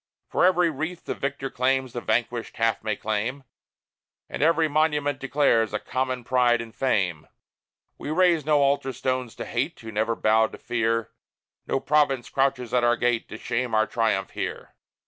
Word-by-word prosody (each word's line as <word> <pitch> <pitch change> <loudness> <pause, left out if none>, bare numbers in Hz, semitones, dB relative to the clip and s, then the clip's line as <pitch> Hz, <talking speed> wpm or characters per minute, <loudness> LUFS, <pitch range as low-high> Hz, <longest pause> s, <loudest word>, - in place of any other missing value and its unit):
For - - +2
every 180 -2 +4
wreath 160 +5 -5
the - - -2
victor 140 -1 -4
wears 130 -1 +1
The 120 - -4
vanquished 120 0 -1
half 115 -2 +1
may 110 -1 -1
claim; 110 +7 -3 0.8
And - - -6
every 165 +1 +3
monument 150 -2 +1
declares 130 -6 +2
A - - 0
common 130 +1 -2
pride 120 -1 +3
and 115 -1 -7
fame. 95 - 0 0.7
We - - -6
raise 170 -1 +3
no 150 -1 +3
altar 140 -1 +1
stones 130 -3 -2
to - - -6
Hate, - - -2
Who 110 - -8
never 110 +2 0
bowed 110 0 +2
to - - -8
Fear: 115 -1 -1 0.6
No 135 - 0
province 140 -3 +1
crouches 130 -3 0
at 125 -1 +3
our 120 0 +3
gate, 120 -1 0
To 110 - -7
shame 115 +1 -2
our 110 0 +4
triumph 110 -5 0
here. - - -5
125 Hz, 170 wpm, -25 LUFS, 115-140 Hz, 0.8 s, every